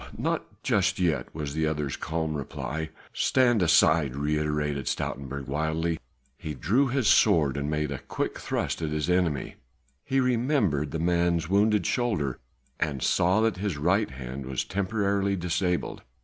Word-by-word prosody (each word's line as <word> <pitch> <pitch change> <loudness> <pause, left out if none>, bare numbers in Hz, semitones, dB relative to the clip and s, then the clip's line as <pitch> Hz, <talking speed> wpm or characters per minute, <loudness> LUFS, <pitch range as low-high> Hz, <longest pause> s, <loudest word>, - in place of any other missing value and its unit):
not - - -3
just - - +2
yet!" 85 -4 +1
was 75 -2 -5
the 80 0 0
other's 75 -3 -2
calm 80 -1 -2
reply. 75 +2 -4 0.2
"Stand 120 -5 +3
aside!" 80 -4 +4
reiterated 75 -1 -1
Stoutenburg 70 0 -3
wildly. 80 +3 -1 0.4
He 75 -3 -5
drew 115 - +2
his 130 -3 0
sword 80 - +4
and 70 +1 -2
made 75 -1 -1
a 70 - -4
quick - - -4
thrust - - -2
at 80 - -1
his 75 +3 -1
enemy; 90 -6 0 0.5
he 135 - +1
remembered 120 - +1
the 80 - -3
man's 85 0 +1
wounded 105 -1 +3
shoulder 95 - 0 0.4
and 70 -3 -1
saw 95 +5 +3
that 110 -3 +1
his 95 -5 -2
right 95 +8 +2
hand 65 0 -7
was 65 -1 -1
temporarily 100 0 0
disabled. 90 0 -1
80 Hz, 150 wpm, -27 LUFS, 75-100 Hz, 0.5 s, aside